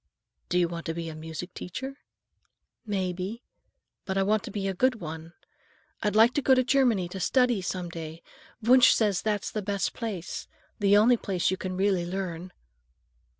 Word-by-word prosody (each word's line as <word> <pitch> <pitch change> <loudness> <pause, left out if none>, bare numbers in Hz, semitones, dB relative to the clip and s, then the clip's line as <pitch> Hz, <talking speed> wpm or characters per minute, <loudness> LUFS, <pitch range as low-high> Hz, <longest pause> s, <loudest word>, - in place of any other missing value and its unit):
"Do 180 - +1
you 175 -1 +3
want 170 0 -6
to 165 - -2
be 165 -1 -4
a 155 - -7
music 160 +3 -7
teacher?" 265 +10 -6 0.9
"Maybe, 190 +3 -3 0.6
but 190 0 -3
I 195 - +3
want 210 +2 +2
to - - -6
be 195 -1 -3
a 195 - -1
good 255 +6 +2
one. 160 -1 -7 0.7
I'd 210 -1 0
like 225 +3 +6
to 290 - +1
go 265 0 +5
to 255 - +3
Germany 245 -8 +2
to 190 - -6
study, 245 +1 +2
some 180 -1 -3
day. 165 -1 -8 0.4
Wunsch 255 +2 +7
says 205 -5 +1
that's 210 -2 -1
the 215 - -2
best 200 0 -1
place,—the 205 0 -2
only 235 +4 +5
place 190 -5 0
you 190 - -1
can 185 -1 -4
really 190 -3 +1
learn." 180 -1 -4
195 Hz, 175 wpm, -27 LUFS, 175-220 Hz, 0.9 s, Wunsch